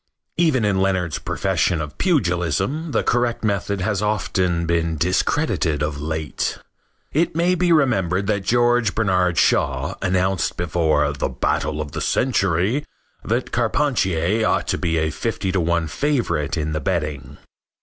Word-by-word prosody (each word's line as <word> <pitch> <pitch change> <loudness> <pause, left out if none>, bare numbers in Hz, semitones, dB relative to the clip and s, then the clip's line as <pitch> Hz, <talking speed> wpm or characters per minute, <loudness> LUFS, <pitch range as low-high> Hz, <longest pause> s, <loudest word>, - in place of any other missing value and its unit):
Even 155 -9 +2
in 100 -2 +1
Leonard's 95 -4 0
profession 85 - 0
of 75 -2 -6
pugilism 135 - 0
the - - +1
correct 120 -1 0
method 100 -1 -1
has 105 0 0
often 95 -5 0
been 85 -1 0
discredited 90 - 0
of 75 -1 -3
late. 80 -2 -3 0.6
It 160 +1 +1
may 175 +2 +2
be 180 0 +1
remembered 100 - +2
that 105 -1 0
George 120 -1 +2
Bernard 90 -5 +1
Shaw 70 +5 +2
announced 95 -1 0
before 80 -4 +1
"the 70 - -2
battle 75 - -1
of 75 -1 -4
the - - -4
century" 105 - +1 0.4
that - - -1
Carpentier 105 - +1
ought - - +1
to - - 0
be 80 -1 0
a 80 0 0
fifty 105 -3 -2
to 95 - 0
one 85 0 +1
favorite 115 - -1
in 75 0 -2
the 75 - -2
betting. 75 -6 -3
95 Hz, 145 wpm, -21 LUFS, 80-115 Hz, 0.6 s, Even